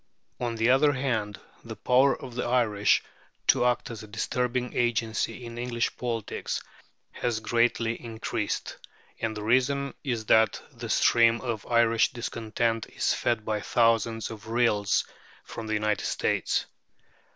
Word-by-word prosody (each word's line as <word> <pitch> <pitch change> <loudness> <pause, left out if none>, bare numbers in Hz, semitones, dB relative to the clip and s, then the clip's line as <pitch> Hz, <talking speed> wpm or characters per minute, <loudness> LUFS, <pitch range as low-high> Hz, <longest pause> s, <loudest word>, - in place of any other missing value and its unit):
On 120 -2 -2
the 115 +2 +3
other 145 +3 +4
hand 115 -6 -2 0.2
the - - -7
power 130 +2 +3
of 125 - -9
the 125 - -2
Irish 115 -4 +2 0.4
to - - +4
act 125 +1 0
as 115 - -7
a 110 - -10
disturbing 125 +3 -2
agency 115 0 -1
in 115 0 -7
English 120 -1 -1
politics 115 -4 -3 0.5
has 120 -3 -2
greatly 115 0 0
increased, 115 -2 -3 0.4
and 110 -1 -2
the 105 - -5
reason 130 +4 +1
is 120 -6 -2
that 110 -1 +4
the - - -8
stream 115 0 +4
of 115 -5 -4
Irish 115 -1 +3
discontent 115 -1 -2
is - - 0
fed 115 -3 -1
by 105 -1 -1
thousands 115 -1 +1
of 110 -1 -10
rills 115 -3 +2 0.4
from 115 - -7
the 110 - 0
United 105 0 0
States. - - 0
115 Hz, 140 wpm, -27 LUFS, 110-125 Hz, 0.5 s, other